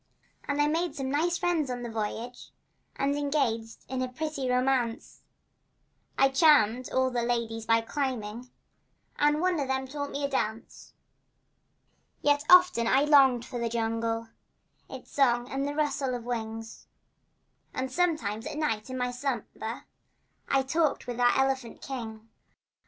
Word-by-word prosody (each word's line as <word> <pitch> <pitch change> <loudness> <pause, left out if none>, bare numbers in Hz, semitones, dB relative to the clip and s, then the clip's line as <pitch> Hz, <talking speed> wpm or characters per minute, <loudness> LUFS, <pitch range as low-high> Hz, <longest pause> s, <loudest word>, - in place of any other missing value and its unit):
And 285 0 -1
I 295 - +4
made 320 +1 0
some 265 -3 -3
nice 340 +4 +1
friends 335 -6 0
on 245 -1 -4
the 240 - -4
voyage, 225 +3 -5 0.5
And 280 +1 0
engaged 270 -6 -1
in 260 0 -3
a 255 - 0
pretty 280 -1 -3
romance. 250 -2 0 1.0
I 270 - +5
charmed 260 -5 +4
all 260 0 +2
the 240 -1 0
ladies 230 -2 -2
by 225 0 +4
climbing, 245 -2 -4 0.7
And 295 +1 +3
one 365 -2 +1
of 280 - -1
them 265 0 -1
taught 285 +1 -4
me 285 - -4
to - - +2
dance. 230 -4 -4 1.3
Yet 290 0 +3
often 360 -10 +6
I 270 +4 +4
longed 270 -5 +5
for 250 -2 -5
the 235 0 -1
jungle— 225 0 -2 0.6
Its - - -10
song 245 -3 +2
and 275 +1 -1
the 290 - -4
rustle 280 -4 0
of 240 - -6
wing— 225 -2 -4 1.1
And 260 0 -3
sometimes 260 - 0
at - - -5
night 230 -7 -1
in 255 - -4
my 250 0 -1
slumber 245 -3 -4 0.7
I 270 -1 +3
talked 310 +3 0
with 245 -1 -5
our 245 0 +4
elephant 265 -3 0
king. 225 -4 -7
260 Hz, 150 wpm, -28 LUFS, 235-285 Hz, 1.3 s, often